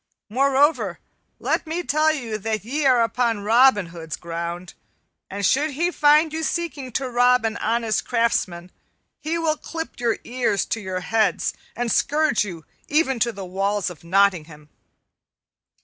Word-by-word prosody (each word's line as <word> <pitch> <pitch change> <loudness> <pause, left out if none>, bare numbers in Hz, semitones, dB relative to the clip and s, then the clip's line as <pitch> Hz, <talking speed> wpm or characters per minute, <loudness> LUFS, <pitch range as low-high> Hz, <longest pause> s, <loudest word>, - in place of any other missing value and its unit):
Moreover, 275 +6 +2 0.4
let - - -1
me 335 +3 -3
tell 310 0 +2
you 235 -8 -4
that 215 0 -3
ye 285 +4 0
are 250 -3 +5
upon 230 -1 0
Robin 225 -1 +4
Hood's 160 -3 -6
ground, 170 +1 -6 0.6
and 200 0 -3
should 295 +9 +2
he 340 +6 0
find 300 0 +4
you 320 - -2
seeking 315 -6 -3
to 265 +2 -1
rob 250 0 +3
an 225 - -1
honest 225 -1 0
craftsman, 185 -7 -1 0.5
he 320 +2 -2
will 320 -2 0
clip 325 -3 -7
your 235 -2 0
ears 240 -5 -1
to 225 - -3
your 185 -2 -4
heads 220 +2 +1 0.2
and 240 -1 -2
scourge 300 -6 +2
you 170 -6 -8 0.2
even 290 -5 +1
to 235 +1 +1
the 195 -3 -8
walls 195 +1 -1
of 165 - -14
Nottingham. 170 -5 +1
235 Hz, 150 wpm, -23 LUFS, 195-290 Hz, 0.6 s, are